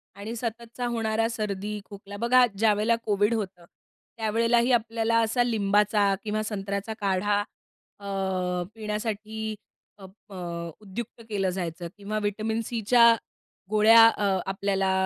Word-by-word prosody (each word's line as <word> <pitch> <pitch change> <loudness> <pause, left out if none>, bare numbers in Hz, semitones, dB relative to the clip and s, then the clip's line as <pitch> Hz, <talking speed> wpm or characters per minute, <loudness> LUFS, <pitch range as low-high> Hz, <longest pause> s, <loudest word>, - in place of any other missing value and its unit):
आणि 215 +4 -6
सततचा 235 +1 -5
होणारा 225 -1 0
सर्दी, 210 -2 -3
खोकला 200 0 -10
बघा 250 +3 +5
ज्यावेळेला 215 +1 +3
कोविड 205 +1 +2
होतं, 190 -5 -4 0.5
त्यावेळेलाही 230 +3 +2
आपल्याला 230 -1 +1
असा 230 +2 +2
लिंबाचा 205 -2 +2
किंवा 215 0 -1
संत्र्याचा 200 0 -3
काढा 205 +1 +1 0.6
अ, 200 - -12 0.7
पिण्यासाठी 215 0 -4 0.4
अप 190 -2 -13 0.2
अ, - - -8 0.5
उद्युक्त 215 +3 -7
केलं 195 -3 0
जायचं 175 -2 -4
किंवा 210 +1 -3
व्हिटॅमिन 215 +2 -1
सीच्या 235 0 +5 0.5
गोळ्या 220 +2 +7
अ, 200 -4 +1
आपल्याला 195 0 0
215 Hz, 115 wpm, -26 LUFS, 200-230 Hz, 0.7 s, गोळ्या